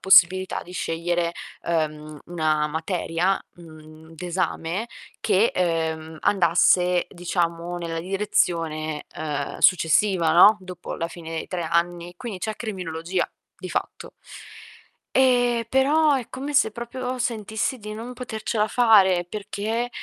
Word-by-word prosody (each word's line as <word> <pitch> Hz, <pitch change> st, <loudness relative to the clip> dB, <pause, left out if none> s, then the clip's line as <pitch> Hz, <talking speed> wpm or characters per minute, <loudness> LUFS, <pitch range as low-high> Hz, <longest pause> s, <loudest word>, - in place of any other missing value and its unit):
possibilità 185 Hz, 0 st, +5 dB
di 180 Hz, -, -12 dB
scegliere, 170 Hz, 0 st, -1 dB, 0.4 s
uhm, 155 Hz, -2 st, -2 dB
1 155 Hz, -3 st, +1 dB
materia, 165 Hz, +3 st, -1 dB, 0.2 s
mhmm, 155 Hz, -1 st, -14 dB
d'esame 175 Hz, -1 st, -2 dB, 0.5 s
che, 210 Hz, +5 st, +3 dB
uhm, 160 Hz, -2 st, -1 dB
andasse, 180 Hz, 0 st, +3 dB
diciamo, 175 Hz, -1 st, -2 dB
nella 165 Hz, -1 st, -4 dB
direzione, 165 Hz, -5 st, -1 dB
uhm, 145 Hz, -2 st, -3 dB
successiva, 180 Hz, -1 st, +4 dB
no, 205 Hz, +5 st, +8 dB
dopo 180 Hz, -2 st, -7 dB
la 165 Hz, 0 st, -3 dB
fine 165 Hz, -2 st, -10 dB
dei 165 Hz, -, -4 dB
3 180 Hz, -2 st, -4 dB
anni. 170 Hz, +1 st, -1 dB
Quindi 220 Hz, -5 st, -6 dB
c'è 215 Hz, +3 st, -4 dB
criminologia, 180 Hz, -4 st, -3 dB, 0.2 s
di -, -, -8 dB
fatto. -, -, -4 dB, 1.1 s
Ehm, 245 Hz, -3 st, +3 dB
però 290 Hz, +4 st, +3 dB
è 255 Hz, -4 st, -2 dB
come 275 Hz, +3 st, -5 dB
se 270 Hz, -6 st, +4 dB
proprio 250 Hz, +2 st, -5 dB
sentissi 230 Hz, +1 st, -2 dB
di 210 Hz, 0 st, -7 dB
non 235 Hz, +3 st, -7 dB
potercela 220 Hz, -3 st, -2 dB
fare 195 Hz, -7 st, +5 dB
perché, 215 Hz, +4 st, -3 dB
180 Hz, 120 wpm, -24 LUFS, 165-215 Hz, 1.1 s, no